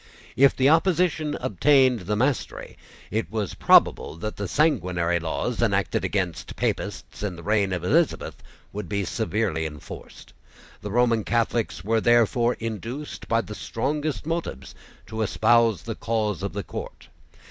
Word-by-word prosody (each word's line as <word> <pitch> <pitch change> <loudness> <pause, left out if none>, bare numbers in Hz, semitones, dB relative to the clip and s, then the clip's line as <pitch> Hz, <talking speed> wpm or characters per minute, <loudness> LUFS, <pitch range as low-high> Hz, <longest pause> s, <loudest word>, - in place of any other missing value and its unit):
If 135 +2 +5
the 135 - +3
opposition 160 -1 +2
obtained 130 - +3
the 105 - +1
mastery, 130 +3 -1 0.4
it 110 0 -2
was 110 -3 -2
probable - - +4
that 110 +6 -5
the 100 - -4
sanguinary 90 - +1
laws 80 -1 -2
enacted - - +1
against 90 -5 -2
Papists - - -3
in 100 -4 -3
the 85 - -11
reign 100 -1 +1
of 90 -2 -2
Elizabeth, 155 - +1 0.3
would 100 -3 -5
be 100 -1 -1
severely 110 -6 -1
enforced. 75 -2 -9 0.5
The 105 - -5
Roman 115 0 +2
Catholics 115 -8 -1
were 110 +2 +1
therefore 120 +1 +3
induced 115 +6 -6
by 115 0 +2
the 105 - -8
strongest 145 +8 -3
motives 165 - -4 0.3
to 110 +2 -5
espouse 115 -2 +3
the 115 - -4
cause 110 -5 -2
of 100 - -3
the 100 0 -3
court. - - -8
110 Hz, 145 wpm, -25 LUFS, 100-130 Hz, 0.5 s, If